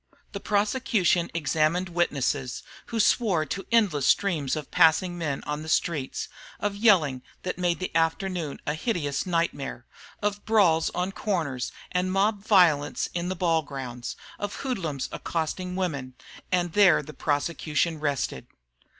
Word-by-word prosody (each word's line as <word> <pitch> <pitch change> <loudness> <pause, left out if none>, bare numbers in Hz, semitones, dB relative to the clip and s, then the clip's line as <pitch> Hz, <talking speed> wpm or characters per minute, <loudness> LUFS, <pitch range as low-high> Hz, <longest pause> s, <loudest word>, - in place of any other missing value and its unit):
The 200 - -5
prosecution 205 -4 +1
examined 160 +3 +1
witnesses, 140 -6 -1 0.2
who 230 - -3
swore 200 -7 +3
to 195 +7 -5
endless 190 - +3
streams 160 -10 +2
of 150 -2 -6
passing 175 +1 +4
men 155 -5 -3
on 150 0 -3
the 160 - -7
streets; 155 -4 0 0.3
of 205 -1 -1
yelling 180 - +4 0.2
that 185 0 -3
made 175 -1 +1
the 185 - -5
afternoon 165 -1 0
a 150 - 0
hideous 155 - -2
nightmare; 165 -7 -2 0.3
of 205 0 -2
brawls 185 -8 +3
on 180 +2 -1
corners 165 -12 -2 0.2
and 180 +1 0
mob 200 +1 +1
violence 170 -9 +3
in 175 0 -2
the 185 - -2
ball 165 -2 +2
grounds; 130 -4 -6 0.2
of 205 0 -4
hoodlums 165 - -2
accosting 180 +3 -3
women. 140 -9 -3 0.4
And 175 -2 +1
there 200 -5 +5
the 155 - -10
prosecution 155 +2 -1
rested. 145 -3 -2
170 Hz, 140 wpm, -26 LUFS, 150-190 Hz, 0.4 s, there